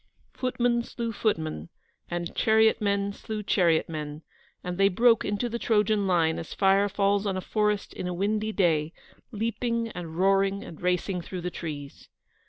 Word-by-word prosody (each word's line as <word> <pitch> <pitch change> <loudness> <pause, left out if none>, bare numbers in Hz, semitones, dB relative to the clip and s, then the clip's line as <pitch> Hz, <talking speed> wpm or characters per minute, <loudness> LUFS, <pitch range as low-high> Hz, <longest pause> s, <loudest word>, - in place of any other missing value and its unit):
Footmen 245 -2 0
slew 235 0 -4
footmen, 160 - -2 0.4
and 175 0 -4
chariot 220 0 +4
men 200 -1 0
slew 215 +1 -6
chariot 170 -5 +2
men, 150 -1 -6 0.4
and 180 +1 -4
they 195 - +6
broke 230 +4 +4
into 205 +4 -1
the 235 0 -4
Trojan 210 -3 +2
line 165 -3 +2
as 165 - -7
fire 195 +1 +3
falls 200 +1 +1
on 190 -1 -1
a - - -1
forest 210 +1 -1
in 180 - -5
a 180 - -2
windy 210 +3 0
day, 165 -5 +1 0.4
leaping 230 +1 -2
and 170 -5 -7
roaring 195 +1 +2
and 160 - -11
racing 180 +1 0
through 180 +2 -6
the 180 +1 -3
trees. 145 -5 -7
195 Hz, 165 wpm, -27 LUFS, 175-215 Hz, 0.4 s, they